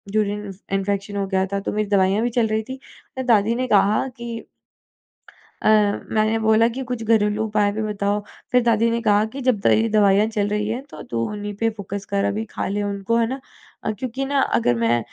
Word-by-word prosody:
Urine 210 -1 -1 0.2
infection 200 +1 -1
हो 200 - 0
गया 190 -1 +1
था 200 - +1
तो 195 - -3
मेरी 210 -1 -1
दवाइयाँ 200 +2 +3
भी 240 - +1
चल 225 - +3
रही 220 0 0
थी। 260 0 -6 0.5
दादी 225 -1 +3
ने 255 +1 -1
कहा 205 +5 +3
कि 235 -1 -5 1.2
अ, - - +2
मैंने 215 +1 +2
बोला 220 +1 +4
कि 265 +3 -4
कुछ 245 -2 -3
घरेलू 215 -1 +2
उपाय 210 -1 +1
भी 215 +1 -3
बताओ, 205 -1 -1 0.3
फिर 250 -1 +5
दादी 230 -1 +3
ने 230 0 0
कहा 210 -1 +3
कि, 275 - -6
"जब 235 - +3
तेरी 220 +3 +3
दवाइयाँ 205 0 +4
चल 210 -2 -1
रही 210 0 -1
हैं 240 +4 -3
तो - - -9
तू 115 - -1
उन्हीं 205 0 -5
पे 225 - +3
फ़ोकस 200 -2 -6
कर 200 0 +1
अभी 215 +2 -1
खा - - -3
ले 205 +1 -1
उनको, 200 +2 -1
है 230 -1 +3
ना? 265 +2 -4 0.4
अ, - - 0
क्योंकि 260 +1 -3
ना 280 0 +1 0.2
अगर 120 +1 +2
मैं 120 +1 +3
210 Hz, 210 wpm, -22 LUFS, 200-230 Hz, 1.2 s, फिर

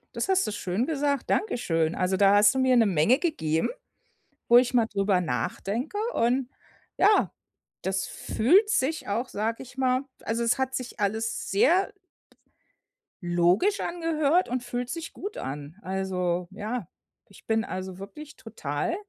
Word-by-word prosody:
Das - - -2
hast 375 - +3
du - - -2
schön 205 +4 -1
gesagt, 285 -3 -1
dankeschön. 165 - 0
Also, 185 +1 0
da 195 +1 +5
hast 205 +4 +5
du 265 - +1
mir 260 -1 +4
'ne 230 - +5
Menge 195 - +3
gegeben, 160 - 0 0.8
wo 240 - +7
ich 250 0 0
mal 235 -2 +4
drüber 200 -3 +1
nachdenke 195 - -3 0.2
und, 245 +2 +1 0.5
ja, 415 +2 +4 0.5
das 190 0 -1
fühlt 370 - +2
sich 310 -2 0
auch, 235 +5 -2
sage 225 +4 -2
ich 250 0 -15
mal 255 0 +1 0.2
also, 230 +1 -1
es 235 +3 +1
hat 265 0 -1
sich 250 -2 -6
alles 220 +2 -1
sehr 340 - +3 1.3
logisch 175 - +2
angehört 330 -1 +1
und 250 0 -2
fühlt 245 0 -4
sich 330 +2 -5
gut 405 +3 -7
an. 145 +5 -6
Also, 180 -2 -2
ja, 210 0 -4 0.4
ich 200 - -18
bin, 225 0 +1
also, 185 -2 -6
wirklich 285 +10 -10
total 160 - -3
230 Hz, 150 wpm, -26 LUFS, 190-265 Hz, 1.3 s, wo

